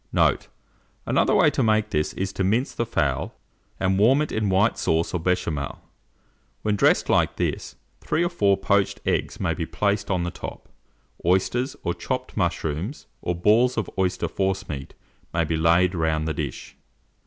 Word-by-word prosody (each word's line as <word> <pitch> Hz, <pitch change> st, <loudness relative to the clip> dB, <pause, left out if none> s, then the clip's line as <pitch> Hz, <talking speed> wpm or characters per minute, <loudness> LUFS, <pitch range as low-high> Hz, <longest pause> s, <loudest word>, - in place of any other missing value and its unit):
Note. -, -, +2 dB, 0.6 s
Another -, -, +2 dB
way -, -, +5 dB
to -, -, 0 dB
make 110 Hz, -1 st, +2 dB
this 75 Hz, 0 st, 0 dB
is 95 Hz, 0 st, -3 dB
to 95 Hz, -, -1 dB
mince 110 Hz, +8 st, +1 dB
the 120 Hz, -, -2 dB
fowl, 70 Hz, -, -1 dB, 0.4 s
and 95 Hz, 0 st, +1 dB
warm 130 Hz, +8 st, +5 dB
it 150 Hz, -, -5 dB
in 110 Hz, -2 st, 0 dB
white 95 Hz, +4 st, +2 dB
sauce 80 Hz, +2 st, 0 dB
or 90 Hz, -, 0 dB
Béchamel. 80 Hz, -5 st, -1 dB, 0.9 s
When 105 Hz, -1 st, +1 dB
dressed 100 Hz, -, +3 dB
like -, -, +2 dB
this, -, -, -3 dB, 0.2 s
3 170 Hz, -, 0 dB
or 175 Hz, -, +1 dB
4 100 Hz, -, +2 dB
poached 100 Hz, 0 st, +1 dB
eggs -, -, -1 dB
may -, -, 0 dB
be -, -, -4 dB
placed 100 Hz, 0 st, -1 dB
on 90 Hz, -3 st, +1 dB
the 90 Hz, -, -2 dB
top: -, -, -8 dB, 0.6 s
oysters, 105 Hz, +9 st, +1 dB
or 85 Hz, -, 0 dB
chopped -, -, -4 dB
mushrooms, 80 Hz, -, -2 dB, 0.2 s
or 90 Hz, -, -1 dB
balls 115 Hz, +8 st, +3 dB
of 110 Hz, -, -2 dB
oyster 90 Hz, -3 st, 0 dB
forcemeat, 95 Hz, -6 st, -3 dB, 0.4 s
may 85 Hz, -, +2 dB
be 80 Hz, 0 st, -1 dB
laid 85 Hz, +3 st, +3 dB
round 80 Hz, -2 st, 0 dB
the 80 Hz, -, -1 dB
dish. 75 Hz, -6 st, -5 dB
95 Hz, 170 wpm, -24 LUFS, 85-105 Hz, 0.9 s, way